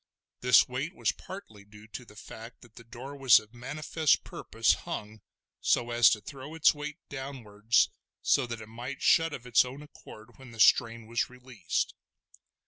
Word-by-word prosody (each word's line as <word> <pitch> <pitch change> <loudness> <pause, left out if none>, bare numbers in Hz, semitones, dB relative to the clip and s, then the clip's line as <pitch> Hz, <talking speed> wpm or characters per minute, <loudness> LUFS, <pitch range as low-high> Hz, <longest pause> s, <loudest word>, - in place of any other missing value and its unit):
This 125 0 +5
weight 135 +8 -4
was - - +1
partly 110 - -11
due 105 +1 -16
to 120 +3 -8
the 105 - -17
fact 115 +2 -11
that 120 -2 -18
the 115 - -12
door 125 +5 -9
was 135 -4 +6
of 110 +1 -17
manifest 145 +5 0
purpose - - 0
hung 105 0 -7 0.4
so 120 0 +1
as 120 0 +6
to 105 - -1
throw 140 +7 -9
its 160 - +5
weight 150 +1 -7
downwards, 120 -5 0 0.4
so 135 -3 +2
that 115 -1 -6
it - - -9
might 120 +4 -7
shut 165 0 +4
of 125 -4 -8
its 125 -1 +4
own 130 +3 -9
accord 120 -5 -15
when 130 -2 -12
the 115 - -13
strain 115 0 +4
was 115 +1 -1
released. 125 -1 -3
120 Hz, 175 wpm, -29 LUFS, 115-135 Hz, 0.4 s, was